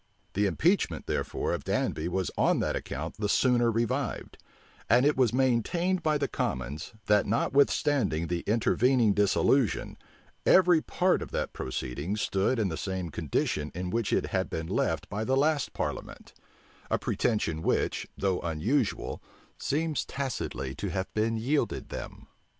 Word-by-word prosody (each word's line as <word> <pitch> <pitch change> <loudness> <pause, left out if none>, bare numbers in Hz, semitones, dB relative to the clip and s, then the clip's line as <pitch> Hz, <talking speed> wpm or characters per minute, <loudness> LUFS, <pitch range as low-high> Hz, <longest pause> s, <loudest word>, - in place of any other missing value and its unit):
The 100 +1 +2
impeachment, 175 - +1
therefore, - - -2
of - - -3
Danby 80 - -1
was 95 +1 -1
on - - +3
that - - 0
account 80 +6 -5
the 105 -1 -1
sooner 120 0 +3
revived; 115 0 -2 0.5
and 120 +5 +5
it 150 - +4
was 125 -4 +3
maintained 135 - +1
by 155 -2 +2
the 140 -1 -1
commons, 70 - -3
that 105 -1 +3
notwithstanding 120 - +2
the 85 +1 -1
intervening 115 +1 +3
dissolution, 105 +4 +2 0.4
every 180 -3 +5
part 185 +3 +1
of - - -6
that - - -2
proceeding 65 +8 -3
stood 100 +4 +1
in 105 -4 +1
the 80 - -4
same 95 -4 -3
condition 75 +1 -1
in 90 0 -3
which 115 -2 -1
it - - +2
had 95 -1 0
been 80 - -3
left - - -1
by 105 +2 -3
the 130 +4 +1
last 145 -1 +2
parliament; - - -5 0.6
a - - +2
pretension 95 -9 -1
which, - - 0
though 95 -2 0
unusual, 100 - -1 0.4
seems 150 -2 0
tacitly 70 - -4
to - - -4
have 95 0 -3
been 110 +1 +1
yielded 135 +7 -1
them. - - -7
110 Hz, 150 wpm, -28 LUFS, 90-135 Hz, 0.6 s, and